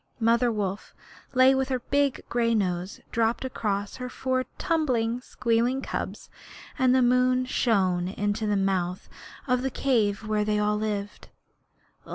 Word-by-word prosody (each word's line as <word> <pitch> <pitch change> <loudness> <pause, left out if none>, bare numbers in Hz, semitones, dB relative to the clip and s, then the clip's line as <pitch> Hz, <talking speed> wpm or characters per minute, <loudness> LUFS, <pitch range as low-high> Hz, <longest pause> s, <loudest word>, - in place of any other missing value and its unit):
Mother 235 +1 +3
Wolf 200 -2 -4 0.4
lay 260 +1 +6
with 265 0 0
her 260 - +1
big 280 +2 0
gray 230 -1 +1
nose 180 -2 -2
dropped 230 +2 0
across 205 -5 -3
her 250 -1 -5
four 255 0 -1
tumbling, 250 -8 0
squealing 245 +2 0
cubs, - - -5 0.5
and 255 -1 +4
the 260 - +4
moon 250 +1 +3
shone 190 -8 +1
into 205 +3 -2
the 205 -1 +1
mouth 185 -2 -1 0.4
of 250 -2 +1
the 265 - -1
cave 220 -6 0
where 215 -1 +1
they 210 0 0
all 210 0 +1
lived. 210 -1 -4
230 Hz, 145 wpm, -26 LUFS, 205-255 Hz, 0.5 s, lay